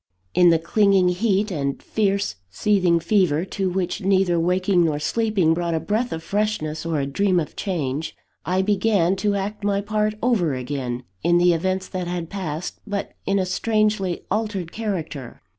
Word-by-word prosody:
In 180 -1 +6
the 165 - +5
clinging 195 +2 +3
heat 200 +2 +1
and 140 -5 -2
fierce 200 - -1
seething 180 - +2
fever, 170 -3 +2
to 190 0 -2
which 180 +2 -2
neither 190 -3 +2
waking 180 +1 +2
nor 155 -3 +1
sleeping 200 -1 +1
brought 170 0 -1
a - - +1
breath 215 +9 -1
of 160 0 -4
freshness 180 -6 -2
or 160 -3 0
a 140 - 0
dream 185 +6 +1
of 155 - -5
change, 155 -6 -3 0.3
I 185 +3 +1
began 195 -3 +2
to 205 +1 0
act 200 +2 -3
my 200 -1 +1
part 210 +1 -1
over 190 - +2
again, 125 -1 -4 0.2
in 175 0 +3
the 175 0 +5
events 185 +3 -1
that 180 -2 -4
had 175 -2 -4
passed, 180 -4 -4
but 205 -1 -3 0.2
in 195 - +2
a 190 - +1
strangely 210 -2 0
altered 205 -5 -2
character. 165 - -4
185 Hz, 170 wpm, -23 LUFS, 165-205 Hz, 0.3 s, In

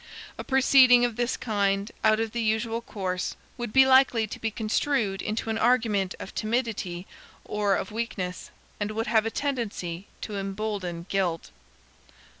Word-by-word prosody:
A - - -3
proceeding 260 -2 +6
of 240 -2 -2
this 240 +2 -1
kind, 200 -1 0
out 215 0 +4
of 225 -1 -1
the 235 - -2
usual 225 +1 0
course, 185 -5 -3 0.2
would 240 -3 -5
be 265 +3 +6
likely 260 -4 +5
to 215 - -8
be 225 - -1
construed 215 -2 0
into 220 +1 -2
an 220 - -2
argument 220 -6 +2
of - - -8
timidity 215 -6 -2 0.4
or 205 -2 +1
of 190 - -4
weakness, 210 -5 -4 0.3
and 205 0 -1
would 225 +1 -2
have 220 0 +2
a - - 0
tendency 210 -10 -3
to 210 -2 -5
embolden 195 -3 -4
guilt. 180 -4 -1
220 Hz, 155 wpm, -26 LUFS, 195-235 Hz, 0.4 s, proceeding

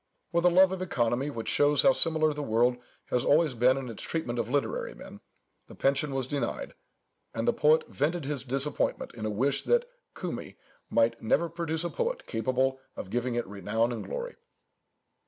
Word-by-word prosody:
With 170 0 +1
a - - +8
love 185 +2 +6
of 190 -1 -4
economy, 125 -5 0
which 115 -6 -6
shows 145 0 +4
how 270 - +7
similar 160 - +2
the 150 - -5
world 120 -1 +2 0.3
has 125 - +2
always 155 0 +3
been 125 +3 +3
in 135 -2 -4
its 115 -3 -7
treatment 125 -8 -3
of 115 0 -2
literary 480 - -1
men, - - -11 0.5
the - - -12
pension 135 +1 +1
was 135 -1 -1
denied, 135 -2 -3 0.6
and 115 0 -2
the - - +4
poet 155 +1 +3
vented 155 +2 -1
his 145 -2 -2
disappointment 135 +3 -1
in 110 -2 -4
a - - -1
wish 130 +7 +1
that 485 0 +2 0.3
Cumæa - - -5 0.3
might 115 0 +2
never 150 +9 +2
produce 165 -1 -3
a 175 - -3
poet 485 +1 -2
capable 130 +3 0 0.2
of 95 - -7
giving 120 0 -1
it 120 - -1
renown 105 +4 -1
and 115 - -4
glory. - - -5
135 Hz, 185 wpm, -28 LUFS, 120-160 Hz, 0.6 s, a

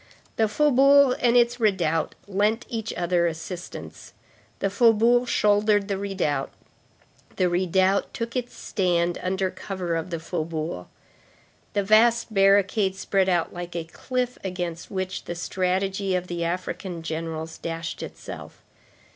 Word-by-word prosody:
The 220 - +2
faubourg 275 +1 +5
and 245 0 +4
its 240 0 +3
redoubt 180 -7 +1
lent 210 +4 +1
each 225 -2 -4
other 175 0 +1
assistance. 170 +2 -7 0.4
The 195 - -1
faubourg 235 +3 +4
shouldered 205 -1 +3
the 195 - 0
redoubt, 185 -9 -1 0.8
the 185 - +2
redoubt 185 +2 +2
took 230 +1 -5
its 245 -1 -3
stand 175 -3 0
under 190 0 -1
cover 185 -4 -4
of 165 +2 -3
the 170 -2 -3
faubourg. 160 - -4 0.9
The 205 - +1
vast 225 +3 +4
barricade 195 0 +3
spread 190 0 +1
out 175 -2 +1
like 175 0 -7
a 170 - -2
cliff 250 +9 -3
against 175 -3 -4
which 190 -1 -4
the 175 - -4
strategy 190 +2 -1
of 180 0 -1
the 175 -1 -3
African 175 0 -4
generals 160 0 -5
dashed 165 0 -5
itself. - - -9
190 Hz, 130 wpm, -25 LUFS, 170-215 Hz, 0.9 s, faubourg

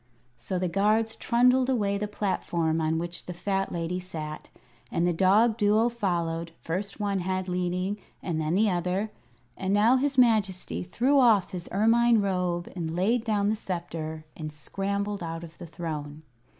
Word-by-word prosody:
So 125 +10 -3
the 180 0 0
guards 215 +5 +2
trundled 250 +2 +3
away 200 -6 +1
the 210 - -2
platform 170 -5 -1
on 160 0 +1
which 170 +1 -4
the 180 - -5
fat 195 +2 -1
lady 170 +1 -2
sat, 155 -4 -7 0.4
and 170 - +1
the 175 - +2
dog 210 +6 +4
Duo 215 +2 +3
followed, 170 -7 -2
first 195 +6 -4
one 200 -2 0
head 185 +1 -2
leading, 180 +3 -1 0.2
and 160 -3 -2
then 155 +2 0
the 215 +3 +4
other. 180 +4 -1 0.4
And 190 +1 0
now 225 +5 +5
his 280 +1 0
Majesty 215 -7 +2
threw 250 +10 +2
off 220 -7 +4
his 180 -2 -5
ermine 230 +3 +4
robe 180 -3 -1
and 165 -2 -3
laid 220 +6 +2
down 210 -3 +1
the 215 - +1
sceptre 165 -5 -5
and 155 -1 -6
scrambled 200 +6 -3
out 165 0 -5
of 165 -1 -12
the 175 - -8
throne. 155 -2 -6
185 Hz, 165 wpm, -27 LUFS, 170-210 Hz, 0.4 s, now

